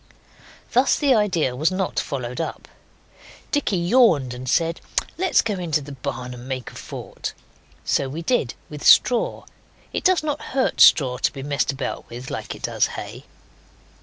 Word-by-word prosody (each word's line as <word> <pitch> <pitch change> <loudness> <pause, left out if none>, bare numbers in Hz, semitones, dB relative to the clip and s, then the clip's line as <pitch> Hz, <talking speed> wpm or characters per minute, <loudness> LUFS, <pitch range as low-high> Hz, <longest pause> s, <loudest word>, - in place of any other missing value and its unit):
Thus 255 +3 +4
the 285 -3 +3
idea 180 - +1
was 155 +5 +2
not 185 0 -1
followed 125 0 -4
up. 165 - -5 0.8
Dicky 290 -10 +1
yawned 170 - +3
and 125 +1 -6
said, 165 +2 +1 0.3
'Let's 370 +1 +2
go 215 - -1
into 160 -4 0
the 145 0 -9
barn 125 -1 -5
and 125 +1 -10
make 130 -2 -4
a - - -17
fort.' - - -7 0.5
So 135 - +1
we 160 +5 -5
did, 165 - 0
with 150 -1 -9
straw. 245 -2 +4 0.5
It - - -2
does 370 -4 +3
not 295 -2 -2 0.2
hurt 260 - +1
straw 125 -4 +6
to - - +1
be 135 -2 -8
messed 145 0 0
about 135 -1 -5
with 125 +2 -8
like - - -5
it - - -14
does - - +1
hay. - - -8
155 Hz, 165 wpm, -23 LUFS, 130-215 Hz, 0.8 s, straw